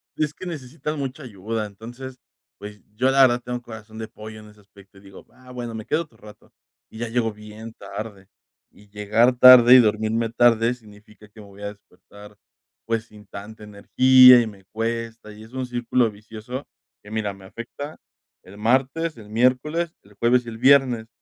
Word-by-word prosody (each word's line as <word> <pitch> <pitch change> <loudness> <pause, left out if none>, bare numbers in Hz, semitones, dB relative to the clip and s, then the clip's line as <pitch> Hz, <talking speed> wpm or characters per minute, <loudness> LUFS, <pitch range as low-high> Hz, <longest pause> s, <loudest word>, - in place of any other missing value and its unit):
es 155 -1 -2
que 185 - -11
necesitan 150 -2 -6
mucha 135 +2 -5
ayuda. 110 -1 -5
Entonces, 120 +6 -10 0.4
pues, 105 +1 -11
yo 130 +4 +1
la 135 +1 +4
verdad 125 -2 +4
tengo 125 0 -5
corazón 110 -2 -12
de 110 0 -6
pollo, 110 0 -11
en 105 0 -14
ese 105 0 -20
aspecto 100 -1 -20
y - - -17
digo: 95 -1 -15
"Ah, 130 0 -17
bueno, 120 -2 -6
me 110 -1 -7
quedo 160 - 0
otro 135 -8 -24
rato, 105 -1 -16 0.4
y 110 - -12
ya 120 - -3
llego 115 -1 -1
bien 105 +2 -11
tarde". 100 -1 -9 0.5
Y 105 0 -21
llegar 110 +4 +1
tarde 125 -1 +9
y - - +9
dormirme 110 0 0
tarde, 115 0 +3
significa 105 -2 -18
que 105 +1 -16
me 105 - -14
voy 100 0 -16
a - - -3
despertar, 105 +1 -18 0.5
pues, 115 0 -2
sin 105 -2 -17
tanta 105 +2 -11
energía, 125 +4 +6
y 115 - -3
me 100 -3 -13
cuesta, 115 +1 -5
y 105 +1 -13
es 110 +3 -17
un 130 -1 -3
círculo 120 -1 0
vicioso 110 +6 -9 0.4
que, 105 - -14
mira, 110 -2 -3
me 95 -1 -16
afecta 120 +9 -9 0.5
el 100 +2 -15
martes, 135 +8 0
el 105 -2 -13
miércoles, 130 +9 0
el 100 - -21
jueves, 120 +3 +2
y - - -7
el 110 - -9
viernes. 130 -3 +3
115 Hz, 190 wpm, -22 LUFS, 105-125 Hz, 0.5 s, tarde